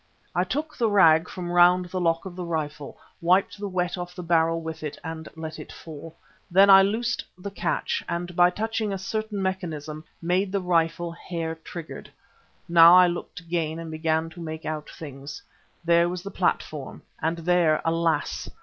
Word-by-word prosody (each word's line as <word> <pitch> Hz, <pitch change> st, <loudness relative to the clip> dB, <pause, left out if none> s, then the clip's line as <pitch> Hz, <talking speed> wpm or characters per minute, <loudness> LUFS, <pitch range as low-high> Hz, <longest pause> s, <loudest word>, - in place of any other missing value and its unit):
I 180 Hz, -, +2 dB
took 300 Hz, +10 st, -3 dB
the 230 Hz, -3 st, +1 dB
rag 165 Hz, -4 st, +5 dB
from 175 Hz, -1 st, -5 dB
round 175 Hz, +1 st, +5 dB
the 185 Hz, -, -2 dB
lock 165 Hz, +1 st, +1 dB
of 185 Hz, -2 st, -7 dB
the 180 Hz, -, -5 dB
rifle, 150 Hz, -4 st, -4 dB, 0.2 s
wiped 185 Hz, +4 st, +2 dB
the 205 Hz, -, -3 dB
wet 180 Hz, -1 st, -2 dB
off 175 Hz, 0 st, -6 dB
the 180 Hz, -, -6 dB
barrel 165 Hz, -1 st, +2 dB
with 160 Hz, -1 st, -6 dB
it 150 Hz, -2 st, -5 dB
and 160 Hz, -1 st, -6 dB
let 160 Hz, -1 st, -7 dB
it -, -, -9 dB
fall. 160 Hz, 0 st, -10 dB, 0.3 s
Then 195 Hz, +3 st, +6 dB
I 195 Hz, 0 st, +10 dB
loosed 235 Hz, +5 st, 0 dB
the 200 Hz, +2 st, -7 dB
catch 175 Hz, -3 st, -2 dB
and 175 Hz, 0 st, -4 dB
by 175 Hz, 0 st, +6 dB
touching 220 Hz, +2 st, -2 dB
a 195 Hz, -, -2 dB
certain 215 Hz, +2 st, -3 dB
mechanism, 160 Hz, -5 st, -4 dB, 0.2 s
made 185 Hz, +3 st, 0 dB
the 200 Hz, -, 0 dB
rifle 170 Hz, -1 st, 0 dB
hair 165 Hz, -1 st, -5 dB
triggered. 165 Hz, 0 st, -9 dB, 0.6 s
Now 170 Hz, 0 st, +8 dB
I 180 Hz, 0 st, +8 dB
looked 175 Hz, 0 st, -4 dB
again 165 Hz, -2 st, -2 dB
and 165 Hz, -1 st, -7 dB
began 160 Hz, +1 st, -1 dB
to 170 Hz, +2 st, -11 dB
make 160 Hz, -1 st, -6 dB
out 155 Hz, -1 st, -4 dB
things. 140 Hz, -1 st, -9 dB, 0.4 s
There 170 Hz, 0 st, +4 dB
was 180 Hz, 0 st, -5 dB
the 200 Hz, -, -6 dB
platform 155 Hz, -6 st, -2 dB, 0.2 s
and 165 Hz, +2 st, 0 dB
there, 170 Hz, -2 st, +2 dB
alas! 165 Hz, 0 st, 0 dB
170 Hz, 180 wpm, -25 LUFS, 160-185 Hz, 0.6 s, I